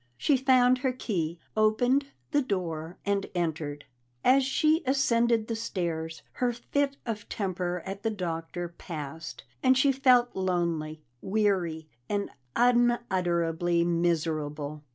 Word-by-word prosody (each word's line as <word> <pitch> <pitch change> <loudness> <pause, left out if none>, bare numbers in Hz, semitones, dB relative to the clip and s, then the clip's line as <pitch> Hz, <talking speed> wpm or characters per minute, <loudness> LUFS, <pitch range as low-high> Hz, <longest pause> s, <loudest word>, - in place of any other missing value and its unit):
She 285 - +3
found 255 -1 +4
her 260 -1 +1
key, 175 -9 -2 0.2
opened 245 +6 +3 0.2
the 290 -2 +3
door 175 - -3
and 200 0 0
entered. 150 -4 -2 0.4
As 265 +2 +5
she 310 +5 +2
ascended 235 -4 +3
the 230 - -3
stairs, 165 -7 -3
her 250 -1 0
fit 275 +4 -1
of 215 -3 -5
temper 180 -3 -2
at 195 +1 -5
the 225 - 0
Doctor 175 -3 -4
passed, 160 -2 -7 0.2
and 260 0 +4
she 275 +1 +4
felt 255 -2 +4
lonely, 170 -4 -1 0.2
weary, 190 -6 0 0.2
and 200 -1 -1 0.2
unutterably 180 -9 +2
miserable. 155 -3 -1
190 Hz, 120 wpm, -28 LUFS, 165-245 Hz, 0.4 s, As